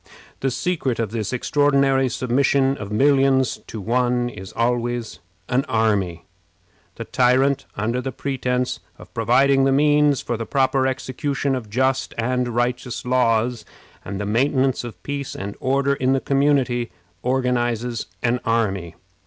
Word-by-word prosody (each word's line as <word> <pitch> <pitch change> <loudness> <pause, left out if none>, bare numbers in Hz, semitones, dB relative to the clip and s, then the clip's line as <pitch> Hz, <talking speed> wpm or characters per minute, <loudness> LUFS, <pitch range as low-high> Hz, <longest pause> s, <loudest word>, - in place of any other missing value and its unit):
The 135 - 0
secret 140 -3 -1
of 115 -3 -2
this 110 -2 -3
extraordinary 135 0 +2
submission 135 +2 +1
of 105 -1 -7
millions 135 +2 +3
to 110 - -6
one 120 +3 +1
is 95 -5 -9
always 120 0 -1 0.3
an 130 +2 +1
army. 100 -7 0 0.7
The - - -6
tyrant, 130 +2 +2
under 115 +5 -1
the 135 - -4
pretense 125 -1 -2 0.2
of - - -15
providing 135 +4 +3
the 135 - +3
means 145 0 +3
for 120 - -3
the 115 - -4
proper 130 -1 +2
execution 135 +2 -2
of 120 -5 -4
just 130 +4 0
and 125 +2 0
righteous 120 +1 -2
laws, 120 -1 +1 0.4
and 100 0 -5
the 105 - -2
maintenance 130 +4 +1
of 110 -7 -9
peace 140 -1 -4
and 100 +1 -5
order 140 +1 +1
in 130 -1 +1
the 135 - +2
community, 135 -4 +1 0.3
organizes 125 -2 -1 0.2
an 125 +1 +1
army. 100 -7 -1
125 Hz, 140 wpm, -22 LUFS, 115-135 Hz, 0.7 s, millions